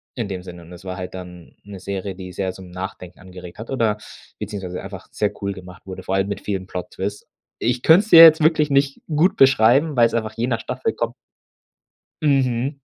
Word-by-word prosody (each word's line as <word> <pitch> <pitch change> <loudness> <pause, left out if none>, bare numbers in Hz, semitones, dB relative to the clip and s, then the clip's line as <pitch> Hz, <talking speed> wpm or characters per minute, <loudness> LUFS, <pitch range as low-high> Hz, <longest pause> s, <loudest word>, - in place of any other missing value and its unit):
in 115 -4 -3
dem 95 -2 -5
Sinne. 90 -2 -11
Es 90 +2 -13
war 90 0 -5
halt 90 0 -6
dann 90 -2 -11
'ne 100 -2 -10
Serie, 95 0 -5
die 90 -1 -9
sehr 95 +1 -2
zum 95 -1 -12
Nachdenken 90 -1 -8
angeregt 90 0 -12
hat 115 - -8
oder 110 -5 +1 0.4
beziehungsweise 90 -3 -5
einfach - - -9
sehr - - -1
cool 100 0 -1
gemacht 90 -1 -12
wurde, 95 -1 -8
vor 95 - -2
allem 95 +1 0
mit 100 -1 -4
vielen 95 -2 -3
Plot 90 -1 -6
Twist. 100 +2 -5 0.3
Ich 120 +1 -1
könnt's 195 +7 +5
dir 165 0 +11
jetzt 160 -1 +8
wirklich 155 -1 +3
nicht 140 0 +1
gut 160 +4 +2
beschreiben, 135 +4 +4
weil's 115 -2 +4
einfach 110 -1 -2
je 120 +2 -1
nach 120 -3 -1
Staffel 130 0 -3
kommt. 115 0 -3 1.1
Mhm. 135 -1 +1
100 Hz, 200 wpm, -21 LUFS, 95-130 Hz, 1.1 s, dir